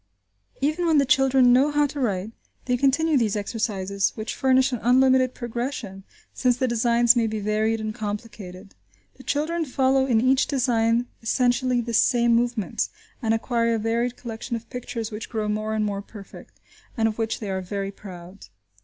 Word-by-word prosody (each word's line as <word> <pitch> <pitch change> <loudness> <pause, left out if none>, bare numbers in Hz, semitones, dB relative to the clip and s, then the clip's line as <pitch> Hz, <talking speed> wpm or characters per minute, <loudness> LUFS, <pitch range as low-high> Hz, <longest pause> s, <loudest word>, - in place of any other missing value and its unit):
Even 310 +5 0
when 320 -2 +4
the 280 - +4
children 265 -1 +4
know 265 +4 +4
how 295 0 +2
to 285 0 -5
write 205 -4 -1 0.3
they 250 - +1
continue 280 +4 +2
these 220 -3 0
exercises, 200 -2 -2
which 215 0 -4
furnish 260 0 +2
an 245 - -2
unlimited 255 +1 +3
progression, 235 -5 -5 0.3
since 250 -1 +1
the 260 - 0
designs 235 0 +3
may 230 -2 +2
be 220 0 -3
varied 215 +2 0
and 215 0 -4
complicated. 205 -3 -7 0.4
The - - -13
children 320 +4 -1
follow 265 -1 +1
in 235 -4 +3
each 260 +3 +3
design 235 -3 +1 0.2
essentially 245 +1 +1
the 235 0 -5
same 235 +1 +3
movements, 235 -3 -1 0.3
and 225 -3 0
acquire 230 0 +1
a - - 0
varied 230 +2 -1
collection 235 0 -6
of 230 0 -7
pictures 245 -3 -5
which 215 +1 -7
grow 215 -2 -2
more 215 +1 -2
and 215 -1 0
more 200 -1 -3
perfect, 200 -1 -13 0.4
and 225 -1 +2
of 220 0 -4
which 225 0 -2
they 205 -3 -5
are 190 0 -2
very 195 +1 -4
proud. 185 -1 -12
235 Hz, 175 wpm, -24 LUFS, 215-255 Hz, 0.4 s, when